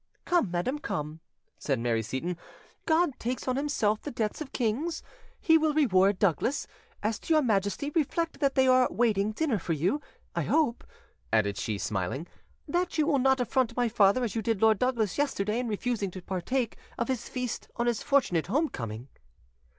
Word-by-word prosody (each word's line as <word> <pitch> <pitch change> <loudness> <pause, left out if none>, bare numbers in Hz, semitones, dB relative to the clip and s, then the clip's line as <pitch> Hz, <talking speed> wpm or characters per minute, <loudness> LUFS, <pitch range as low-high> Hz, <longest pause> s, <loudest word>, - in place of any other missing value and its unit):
"Come, 350 - +2
madam, 180 +12 -1
come," 155 - -4 0.4
said 135 -3 0
Mary 115 -1 0
Seyton, 130 +10 -3 0.5
"God 320 -3 +2
takes 250 +3 -3
on 255 - +1
Himself 240 -7 0
the - - -5
debts 225 0 -2
of 290 - -6
kings; 275 +8 -1 0.4
He 320 -1 +5
will 310 -1 +1
reward 200 -9 +4
Douglas. 200 - +1 0.4
As 215 +1 0
to 325 - +1
your 305 - +4
Majesty, 215 +5 0
reflect 330 +2 -1
that 275 -2 +1
they 265 0 +4
are 255 -1 +5
waiting 215 -3 +1
dinner 245 -2 0
for 165 - -2
you. 180 - 0 0.3
I - - +1
hope," 290 -7 +1 0.5
added 105 -2 +2
she, 105 +1 -2
smiling, 100 - -2 0.4
"that 350 +3 -1
you 305 - +3
will 290 -3 +2
not 265 0 +3
affront 255 0 0
my 245 -1 +2
father 215 +2 +4
as 225 -5 -2
you 225 - -1
did 225 -1 0
Lord 220 -1 +4
Douglas 240 -3 0
yesterday 225 -6 0
in 250 - -2
refusing 220 -1 -1
to 185 +1 -8
partake 225 +7 -2 0.2
of 235 - -1
his 255 -3 -3
feast 250 -3 -4
on 235 - -1
his 240 -2 0
fortunate 215 - +2
home 295 - +1
coming." 115 +1 -6
235 Hz, 180 wpm, -28 LUFS, 190-280 Hz, 0.5 s, He